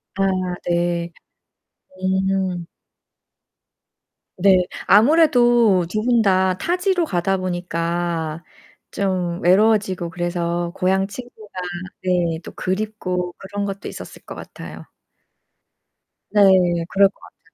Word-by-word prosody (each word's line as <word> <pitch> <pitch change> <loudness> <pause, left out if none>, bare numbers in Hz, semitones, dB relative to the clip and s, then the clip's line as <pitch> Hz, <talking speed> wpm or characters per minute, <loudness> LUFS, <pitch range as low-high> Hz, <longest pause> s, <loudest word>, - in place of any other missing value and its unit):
아 195 - 0 0.5
네. 170 0 0 1.2
음. 185 -3 -1 1.7
네. 190 +1 +5 0.3
아무래도 240 - +5
두 215 +2 -1
분 240 0 +3
다 185 -2 +2
타지로 360 - 0
가다 190 - 0
보니까 170 -2 -3 0.5
좀 180 -3 -2
외로워지고 190 -2 +2
그래서 175 0 -2
고향 190 +1 +1
친구가 220 -1 -11 0.5
네 175 -3 0
또 - - -9
그립고 185 -3 -3
그런 200 +1 -5
것도 195 0 -5
있었을 - - -10
것 - - -9
같아요. - - -10 1.5
네. 210 - +3 0.5
그럴 195 0 +4
것 - - -28
같아요. - - -18
185 Hz, 190 characters per minute, -21 LUFS, 175-210 Hz, 1.7 s, 네